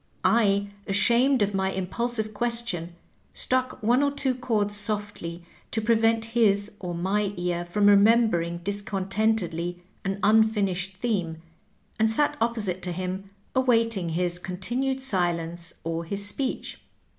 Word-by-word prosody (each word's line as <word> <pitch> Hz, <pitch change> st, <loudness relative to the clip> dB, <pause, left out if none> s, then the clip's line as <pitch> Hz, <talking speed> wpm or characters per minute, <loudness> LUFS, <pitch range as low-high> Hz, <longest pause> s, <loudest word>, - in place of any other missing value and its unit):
I, 200 Hz, -3 st, +3 dB, 0.2 s
ashamed 235 Hz, +5 st, +4 dB
of 205 Hz, 0 st, -1 dB
my 190 Hz, 0 st, 0 dB
impulsive 215 Hz, +4 st, -2 dB
question, 210 Hz, -7 st, -2 dB, 0.4 s
struck 255 Hz, -1 st, 0 dB
one 240 Hz, +5 st, +3 dB
or 285 Hz, -, +3 dB
two 280 Hz, -2 st, 0 dB
chords 220 Hz, -5 st, 0 dB
softly 205 Hz, -5 st, -3 dB, 0.2 s
to 225 Hz, -, -1 dB
prevent 225 Hz, 0 st, +2 dB
his 205 Hz, -3 st, +2 dB
or 175 Hz, -2 st, -5 dB
my 200 Hz, +3 st, 0 dB
ear 175 Hz, -1 st, -1 dB
from 200 Hz, +4 st, 0 dB
remembering 200 Hz, -5 st, +4 dB
discontentedly 195 Hz, -3 st, -1 dB, 0.2 s
an 195 Hz, 0 st, -2 dB
un 220 Hz, +2 st, +6 dB
finished 195 Hz, -4 st, -1 dB
theme, 180 Hz, -8 st, -2 dB, 0.6 s
and 220 Hz, 0 st, +3 dB
sat 290 Hz, +6 st, +2 dB
opposite 215 Hz, -6 st, 0 dB
to 180 Hz, -, -3 dB
him 185 Hz, +2 st, -4 dB, 0.3 s
awaiting 230 Hz, -8 st, +2 dB
his 175 Hz, +1 st, 0 dB
continued 240 Hz, +10 st, -1 dB
silence 175 Hz, -7 st, -1 dB
or 165 Hz, 0 st, -3 dB
his 200 Hz, +4 st, -3 dB
speech. 255 Hz, +6 st, -2 dB
205 Hz, 130 wpm, -26 LUFS, 180-230 Hz, 0.6 s, un